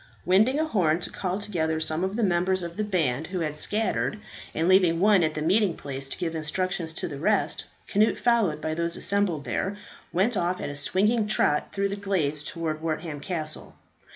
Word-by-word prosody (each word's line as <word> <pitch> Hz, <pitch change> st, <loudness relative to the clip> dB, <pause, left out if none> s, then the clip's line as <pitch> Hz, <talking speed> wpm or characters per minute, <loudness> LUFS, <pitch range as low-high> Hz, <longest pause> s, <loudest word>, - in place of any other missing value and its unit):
Winding 215 Hz, +10 st, +4 dB
a 315 Hz, -, +2 dB
horn 175 Hz, -, +2 dB
to -, -, -3 dB
call 185 Hz, -1 st, -2 dB
together 165 Hz, -6 st, -1 dB
some 160 Hz, +2 st, 0 dB
of 190 Hz, +2 st, -1 dB
the 235 Hz, -, 0 dB
members 185 Hz, 0 st, +2 dB
of 170 Hz, 0 st, -6 dB
the 215 Hz, -, -1 dB
band 160 Hz, -8 st, 0 dB
who 185 Hz, -1 st, -3 dB
had 150 Hz, -2 st, -2 dB
scattered, 210 Hz, +5 st, -1 dB, 0.4 s
and 165 Hz, +2 st, +1 dB
leaving 180 Hz, -3 st, +5 dB
one 200 Hz, 0 st, +5 dB
at 155 Hz, -1 st, 0 dB
the 150 Hz, -, -2 dB
meeting 190 Hz, +1 st, +2 dB
place 135 Hz, -1 st, -5 dB
to -, -, -4 dB
give 165 Hz, -2 st, -2 dB
instructions 165 Hz, +2 st, -2 dB
to -, -, -3 dB
the 140 Hz, -2 st, -7 dB
rest, 205 Hz, +6 st, +1 dB, 0.2 s
Cnut, 215 Hz, +2 st, +2 dB
followed 225 Hz, -11 st, +2 dB
by 155 Hz, +1 st, -2 dB
those 170 Hz, +1 st, -1 dB
assembled 195 Hz, -8 st, 0 dB
there, 200 Hz, +1 st, -2 dB, 0.3 s
went 200 Hz, +7 st, +2 dB
off 180 Hz, -1 st, 0 dB
at -, -, -4 dB
a -, -, -7 dB
swinging 210 Hz, +9 st, +1 dB
trot 150 Hz, -8 st, +2 dB
through 200 Hz, 0 st, 0 dB
the 200 Hz, -, -2 dB
glades 180 Hz, -8 st, 0 dB
towards 155 Hz, 0 st, -4 dB
Wortham 160 Hz, -1 st, -3 dB
Castle. 155 Hz, -1 st, -3 dB
175 Hz, 200 wpm, -26 LUFS, 155-200 Hz, 0.4 s, leaving